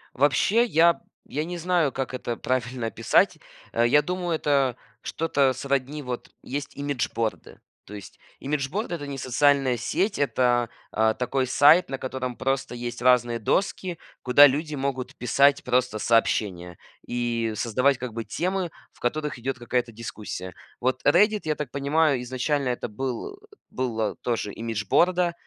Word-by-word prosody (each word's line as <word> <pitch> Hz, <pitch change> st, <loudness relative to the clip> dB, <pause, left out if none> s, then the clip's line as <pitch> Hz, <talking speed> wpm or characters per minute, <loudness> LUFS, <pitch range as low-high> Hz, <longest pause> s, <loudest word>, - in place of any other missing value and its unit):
Вообще 145 Hz, -, +3 dB
я 170 Hz, -6 st, +4 dB, 0.3 s
я 150 Hz, +2 st, -2 dB
не 175 Hz, +2 st, -5 dB
знаю, 170 Hz, -4 st, +1 dB
как 130 Hz, -1 st, -4 dB
это 120 Hz, -2 st, -4 dB
правильно 125 Hz, -2 st, -2 dB
описать. -, -, +2 dB, 0.4 s
Я 120 Hz, +5 st, +4 dB
думаю, 180 Hz, +1 st, -3 dB
это 140 Hz, -5 st, +1 dB, 0.2 s
что-то 140 Hz, -4 st, +1 dB
сродни 140 Hz, +2 st, -2 dB
вот 125 Hz, -3 st, -6 dB
есть 140 Hz, +1 st, -6 dB
имиджборды. 115 Hz, -6 st, -3 dB, 0.2 s
То 105 Hz, -, -13 dB
есть 100 Hz, -2 st, -10 dB, 0.2 s
имиджборда- 150 Hz, -, -2 dB
это 145 Hz, -3 st, -7 dB
не 140 Hz, -1 st, -5 dB
социальная 135 Hz, 0 st, +2 dB
сеть, 195 Hz, -, -1 dB
это, 125 Hz, -4 st, +2 dB, 0.2 s
э, 110 Hz, 0 st, +3 dB
такой 130 Hz, +1 st, 0 dB
сайт, 150 Hz, +7 st, +5 dB
на 135 Hz, -, -3 dB
котором 130 Hz, -1 st, -4 dB
просто 135 Hz, -2 st, -1 dB
есть 120 Hz, 0 st, -5 dB
разные 120 Hz, -2 st, +3 dB
доски, 180 Hz, -, -1 dB, 0.3 s
куда 130 Hz, +3 st, +8 dB
люди 150 Hz, +3 st, -2 dB
могут 135 Hz, -2 st, -3 dB
писать 140 Hz, +3 st, +3 dB
просто 125 Hz, -3 st, +1 dB
сообщения 95 Hz, -7 st, +1 dB, 0.3 s
и 120 Hz, -2 st, -1 dB
создавать 125 Hz, +5 st, +1 dB
как 125 Hz, -2 st, -6 dB
бы 115 Hz, 0 st, -4 dB
темы, 180 Hz, -, -2 dB, 0.2 s
в -, -, -24 dB
которых 150 Hz, +3 st, -2 dB
идет 130 Hz, +3 st, -3 dB
какая-то 120 Hz, 0 st, -1 dB
дискуссия. 105 Hz, -5 st, -7 dB, 0.3 s
Вот 130 Hz, +1 st, 0 dB
"Реддит", 210 Hz, +7 st, +4 dB
я 155 Hz, -1 st, 0 dB
так 145 Hz, -5 st, -5 dB
понимаю, 140 Hz, -1 st, +1 dB
изначально 130 Hz, +2 st, -1 dB
это 125 Hz, -, -2 dB
был 130 Hz, -, -5 dB, 0.3 s
была 115 Hz, -5 st, -2 dB
тоже 115 Hz, -4 st, -2 dB
имиджборда, 170 Hz, -, +1 dB
130 Hz, 145 wpm, -25 LUFS, 120-150 Hz, 0.4 s, куда